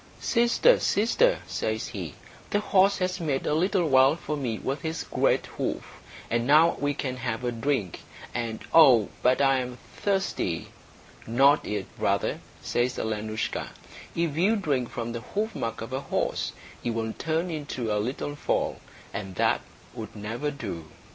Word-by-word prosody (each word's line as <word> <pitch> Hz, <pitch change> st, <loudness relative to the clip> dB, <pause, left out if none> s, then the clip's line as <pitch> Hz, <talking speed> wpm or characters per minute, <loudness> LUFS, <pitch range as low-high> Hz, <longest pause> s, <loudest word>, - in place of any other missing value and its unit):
"Sister, 240 Hz, -, +4 dB
sister," 445 Hz, -, +3 dB
says -, -, -2 dB
he, -, -, -6 dB, 0.3 s
"the 205 Hz, -, +2 dB
horse 200 Hz, -1 st, +4 dB
has 185 Hz, 0 st, -1 dB
made 145 Hz, -5 st, -1 dB
a -, -, +1 dB
little 180 Hz, +2 st, +2 dB
well 135 Hz, +1 st, +6 dB
for 155 Hz, -2 st, -4 dB
me 125 Hz, -6 st, -2 dB
with 135 Hz, +5 st, -3 dB
his 160 Hz, -1 st, -3 dB
great -, -, +1 dB
hoof, -, -, -5 dB, 0.3 s
and 120 Hz, +1 st, 0 dB
now 155 Hz, +4 st, +6 dB
we 145 Hz, 0 st, 0 dB
can 130 Hz, -2 st, -3 dB
have 120 Hz, -1 st, -3 dB
a 120 Hz, -, 0 dB
drink; 115 Hz, -, -1 dB, 0.3 s
and 115 Hz, -2 st, -3 dB
oh, 130 Hz, -10 st, +7 dB
but 125 Hz, +2 st, +3 dB
I 135 Hz, -1 st, +4 dB
am 125 Hz, -1 st, -5 dB, 0.2 s
thirsty!" 190 Hz, -, -1 dB, 0.6 s
"Not 135 Hz, +6 st, +4 dB
yet, 105 Hz, -, -2 dB
brother," -, -, +1 dB, 0.2 s
says 125 Hz, +1 st, 0 dB
Alenoushka. 110 Hz, 0 st, -2 dB, 0.5 s
"If 165 Hz, -3 st, 0 dB
you 200 Hz, +7 st, +4 dB
drink 140 Hz, -, 0 dB
from 120 Hz, 0 st, -4 dB
the 115 Hz, 0 st, -4 dB
hoofmark 205 Hz, -, -3 dB
of 115 Hz, +3 st, -6 dB
a 130 Hz, -, 0 dB
horse, -, -, -1 dB, 0.3 s
you 120 Hz, -, -1 dB
will 110 Hz, -1 st, -2 dB
turn 165 Hz, +3 st, -1 dB
into 130 Hz, -8 st, -2 dB
a 105 Hz, -, +1 dB
little 135 Hz, +5 st, -3 dB
foal, -, -, 0 dB, 0.4 s
and 95 Hz, -2 st, -5 dB
that -, -, +2 dB, 0.3 s
would -, -, -8 dB
never 115 Hz, +8 st, -3 dB
do." 85 Hz, -, -6 dB
135 Hz, 160 wpm, -27 LUFS, 115-165 Hz, 0.6 s, oh